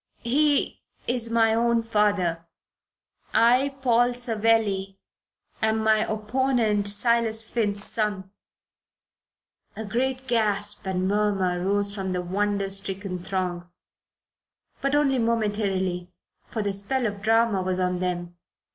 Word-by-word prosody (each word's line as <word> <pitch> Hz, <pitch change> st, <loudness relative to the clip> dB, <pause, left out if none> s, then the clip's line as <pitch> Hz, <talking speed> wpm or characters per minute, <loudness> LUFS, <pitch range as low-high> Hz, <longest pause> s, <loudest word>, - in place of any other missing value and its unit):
He 285 Hz, +4 st, +1 dB, 0.2 s
is 240 Hz, -1 st, -2 dB
my 225 Hz, -1 st, +3 dB
own 235 Hz, 0 st, +2 dB
father; 205 Hz, -7 st, +1 dB, 0.9 s
I, 255 Hz, +4 st, +4 dB
Paul 245 Hz, 0 st, +3 dB
Savelli, 220 Hz, -5 st, 0 dB, 0.6 s
am 220 Hz, 0 st, +2 dB
my 220 Hz, 0 st, +2 dB
opponent, 220 Hz, -1 st, +1 dB
Silas 225 Hz, +1 st, 0 dB
Finn's 205 Hz, -4 st, -1 dB
son." 205 Hz, -4 st, -1 dB, 1.4 s
A 220 Hz, -, -5 dB
great 260 Hz, +5 st, -1 dB
gasp 205 Hz, -4 st, 0 dB
and 185 Hz, 0 st, 0 dB
murmur 195 Hz, -3 st, +1 dB
rose 200 Hz, +1 st, 0 dB
from 190 Hz, -2 st, -3 dB
the 180 Hz, -, -1 dB
wonder 200 Hz, +2 st, -1 dB
stricken 195 Hz, -1 st, -4 dB
throng, 180 Hz, -1 st, -3 dB, 1.1 s
but 275 Hz, +1 st, +1 dB
only 275 Hz, -3 st, +2 dB
momentarily, 200 Hz, -6 st, -1 dB, 0.4 s
for 220 Hz, -, -3 dB
the 200 Hz, -1 st, -1 dB
spell 220 Hz, +6 st, -1 dB
of 205 Hz, -2 st, -3 dB
drama 225 Hz, -2 st, +3 dB
was 185 Hz, 0 st, -1 dB
on 180 Hz, -1 st, 0 dB
them. 175 Hz, -1 st, -3 dB
210 Hz, 115 wpm, -25 LUFS, 190-230 Hz, 1.4 s, I